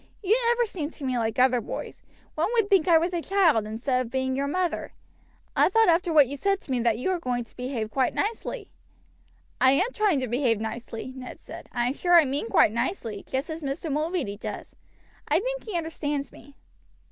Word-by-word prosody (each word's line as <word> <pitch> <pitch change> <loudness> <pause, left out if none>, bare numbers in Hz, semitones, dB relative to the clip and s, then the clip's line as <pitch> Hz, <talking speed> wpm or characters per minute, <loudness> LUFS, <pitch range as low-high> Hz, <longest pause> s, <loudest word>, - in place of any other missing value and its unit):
You 405 +3 +4
never 475 0 +3
seem 330 -9 -4
to 305 - -12
me 255 -2 0
like 225 +2 -1
other 250 -1 +4
boys. - - -7 0.3
One 315 - 0
would 450 -4 +1
think 380 -3 +4
I 335 -2 +7
was 340 +3 0
a 345 - -1
child 330 - +3
instead 250 +4 -1
of 235 - -9
being 260 0 -1
your 280 +1 -1
mother. 360 +3 -2 0.6
I - - +4
thought 445 0 +4
after 340 +1 +2
what 300 -3 +7
you 280 - -5
said 390 +7 0
to - - -9
me 255 - +1
that 230 -2 +2
you 255 +10 -1
were 365 - -1
going 245 -5 -2
to 230 - -20
behave 245 -4 -4
nicely." 410 - -1 0.9
"I 260 0 +6
am 385 - +1
trying 415 - +2
to 255 - -2
behave 240 -2 +1
nicely," 230 +2 -6
Ned 255 -1 -8
said. - - -11
"I 240 -1 0
am 250 - 0
sure 350 +4 +2
I 335 -3 +8
meant 270 -3 -2
quite 210 - +5
nicely, 230 - -3
just 270 +5 -2
as 320 +1 -5
Mr. 290 +3 -3
Mulready 300 - -1
does; - - -7 0.5
I - - +3
think - - -4
he 420 -6 -2
understands 295 -3 -3
me." 285 -1 -16
285 Hz, 210 wpm, -26 LUFS, 250-360 Hz, 0.9 s, I